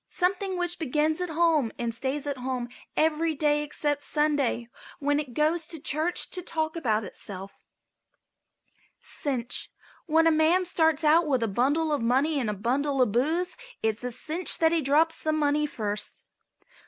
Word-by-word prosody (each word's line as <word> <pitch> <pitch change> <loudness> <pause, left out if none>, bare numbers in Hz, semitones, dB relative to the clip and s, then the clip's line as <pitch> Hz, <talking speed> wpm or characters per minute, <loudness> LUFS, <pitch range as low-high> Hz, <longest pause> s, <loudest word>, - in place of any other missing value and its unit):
Something 375 +1 -1
which 350 0 -2
begins 310 +2 0
at 360 - -2
home 320 -7 +2
and 235 -1 -2
stays 265 +5 -3
at 285 -2 -3
home 250 -1 -3 0.3
every 315 +1 +2
day 295 0 +2
except 295 -1 -1
Sunday, 290 -6 0 0.3
when 290 0 +1
it 270 -6 -6
goes 315 +2 +1
to 325 -2 -6
church 310 +5 -1
to 365 - -5
talk 315 -2 -2
about 225 -9 0
itself. 195 0 -8 1.4
CINCH. 250 -5 -3 0.4
When 325 +1 +4
a 330 - +5
man 320 +4 +3
starts 320 -3 +2
out 315 +2 +4
with 260 -5 +1
a - - +1
bundle 285 +9 +1
of 290 - 0
money 270 +6 +2
and 235 -5 -1
a - - -1
bundle 270 +7 -1
of 250 -5 +3
booze 315 - 0 0.3
it's 220 +1 -1
a 250 - -3
cinch 315 +8 +1
that 325 -1 +3
he 335 -1 +2
drops 310 +4 +2
the 310 - 0
money 300 0 +1
first. 210 -6 -4
295 Hz, 165 wpm, -27 LUFS, 255-320 Hz, 1.4 s, a